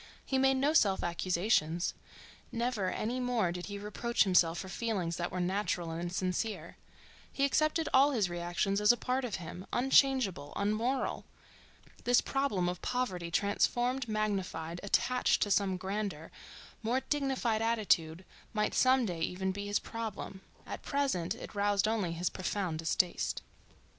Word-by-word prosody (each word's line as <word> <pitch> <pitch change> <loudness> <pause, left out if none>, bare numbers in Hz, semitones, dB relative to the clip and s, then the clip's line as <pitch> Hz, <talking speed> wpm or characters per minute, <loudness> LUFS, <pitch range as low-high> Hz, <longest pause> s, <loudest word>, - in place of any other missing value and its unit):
He 265 - 0
made 270 0 +4
no 285 +3 +2
self 200 -11 +3
accusations: 175 -1 +1 0.6
never 230 -5 -1
any 235 +6 -2
more 245 -8 +1
did 180 0 -6
he 200 0 -5
reproach 210 +4 0
himself 175 -4 +3
for 190 - -5
feelings 185 -4 -2
that 175 0 -2
were 185 - -3
natural 180 -2 -1
and 170 +2 -4
sincere. 185 -1 -2 0.6
He 275 - +1
accepted 310 +3 +1
all 275 +2 +6
his 225 -9 +1
reactions 175 +3 -1
as 210 - +7
a 240 - +1
part 255 +3 -1
of 235 -5 -2
him, 180 +1 -8
unchangeable, 255 - +3
unmoral. 220 +6 -1 0.8
This 245 0 +5
problem 270 -10 0
of 180 0 -3
poverty 190 -9 -2
transformed, 240 +7 +1
magnified, 195 -6 -2
attached 250 +5 +2
to 205 - -2
some 195 -2 +2
grander, 190 -4 -4 0.5
more 240 +4 0
dignified 265 -5 0
attitude 190 -7 +1 0.3
might 210 -1 0
some 255 -1 +4
day 175 -5 -3
even 190 +3 -1
be 205 +1 -5
his 205 +1 +1
problem; 220 -4 -6 0.2
at - - -6
present 270 - -1
it - - -9
roused 205 0 +2
only 210 -6 0
his 175 +2 -1
profound 185 -3 -2
distaste. 170 +2 0
205 Hz, 150 wpm, -32 LUFS, 180-245 Hz, 0.8 s, as